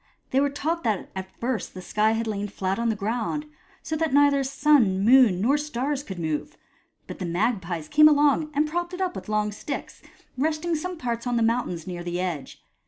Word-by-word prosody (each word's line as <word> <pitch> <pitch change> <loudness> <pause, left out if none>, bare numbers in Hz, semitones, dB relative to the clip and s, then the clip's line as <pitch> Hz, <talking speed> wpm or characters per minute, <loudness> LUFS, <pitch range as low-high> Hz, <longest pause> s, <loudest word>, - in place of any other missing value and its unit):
They 265 - +3
were 285 +1 +2
taught 320 +4 -2
that 215 -4 -1
at 190 0 -7
first 240 -5 -3
the 185 - -7
sky 215 +4 +2
had 225 +1 -1
lain 205 -2 -2
fiat 195 0 -2
on 235 0 +1
the 220 - 0
ground, 230 +8 -2 0.4
so 315 - -3
that 315 -3 0
neither 285 -1 +4
sun, 265 -8 +3
moon, 240 -6 +6
nor 275 +7 +3
stars 285 -1 -2
could 190 -10 -8
move, 155 -3 -3 0.5
but - - -9
the 185 - -3
magpies 175 -4 -1
came 305 - +7
along 295 +1 +3
and 300 +2 +2
propped 345 +3 -3
it 370 - -6
up 365 -1 -1
with - - -7
long 210 0 0
sticks, 275 +7 -6 0.4
resting 315 +3 0
some 360 +3 -4
parts 235 -4 -3
on 245 -1 +1
the 230 - +2
mountains 225 -8 0
near 175 -2 -5
the 175 0 -3
edge. 170 -7 -4
235 Hz, 205 wpm, -25 LUFS, 195-295 Hz, 0.5 s, came